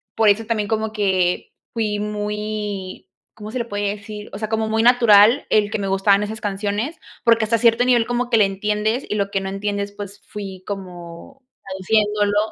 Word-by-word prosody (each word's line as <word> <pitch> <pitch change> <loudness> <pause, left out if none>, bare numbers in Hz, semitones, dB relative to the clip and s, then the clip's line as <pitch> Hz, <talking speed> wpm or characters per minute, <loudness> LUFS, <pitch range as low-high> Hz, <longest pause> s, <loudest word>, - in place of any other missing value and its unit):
por 220 -1 +4
eso 215 +2 +2
también 215 -2 -1
como 220 -1 -1
que 190 -4 0 0.2
fui 215 -3 -1
muy, 210 -2 -4 0.2
¿cómo 215 0 -9
se 255 - -3
le 235 - -2
puede 205 -2 -2
decir? 210 0 -9
o - - -7
sea, 215 +1 -3
como 220 0 -1
muy 220 0 +1
natural 235 0 +6
el 210 -1 +3
que - - -1
me 200 - -2
gustaban 195 +1 +3
esas 220 +1 -5
canciones, 205 +8 -2 0.3
porque 230 -1 +4
hasta 225 +1 +2
cierto 230 +1 +4
nivel 245 -2 +3
como 245 0 -1
que 235 - +4
le 210 - +5
entiendes 210 +5 -1
y - - -1
lo 200 -1 0
que 195 -1 -1
no 190 - -4
entiendes, 200 +1 -3
pues 200 0 -9
fui 195 -3 -8
como 185 +5 -8 0.2
traduciéndolo 205 +2 0
210 Hz, 190 wpm, -21 LUFS, 200-220 Hz, 0.3 s, natural